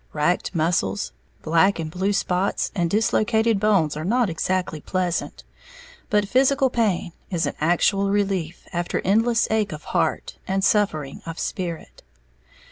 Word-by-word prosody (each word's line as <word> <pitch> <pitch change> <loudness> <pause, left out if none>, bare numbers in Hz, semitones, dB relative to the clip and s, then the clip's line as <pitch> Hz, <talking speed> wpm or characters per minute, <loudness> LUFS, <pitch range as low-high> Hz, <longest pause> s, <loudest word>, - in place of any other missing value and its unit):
Racked 175 +5 0
muscles, 130 - 0 0.3
black 165 +5 +3
and 160 -2 -4
blue 190 +4 0
spots, 195 -1 0
and 175 -5 0
dislocated 220 +1 +2
bones 195 -8 +2
are 155 - -4
not 230 +2 +1
exactly 175 -1 -2
pleasant; 180 0 -2 0.7
but 210 -1 +2
physical 265 +2 +3
pain 210 -8 0 0.2
is 170 -4 0
an 145 - -2
actual 195 +5 +2
relief 195 -5 -1
after 175 0 -1
endless 225 +4 +2
ache 220 -2 +1
of 150 - -8
heart - - -1
and 195 0 0
suffering 155 -10 +1
of 165 0 -6
spirit. 170 -4 -5
185 Hz, 135 wpm, -23 LUFS, 165-210 Hz, 0.7 s, black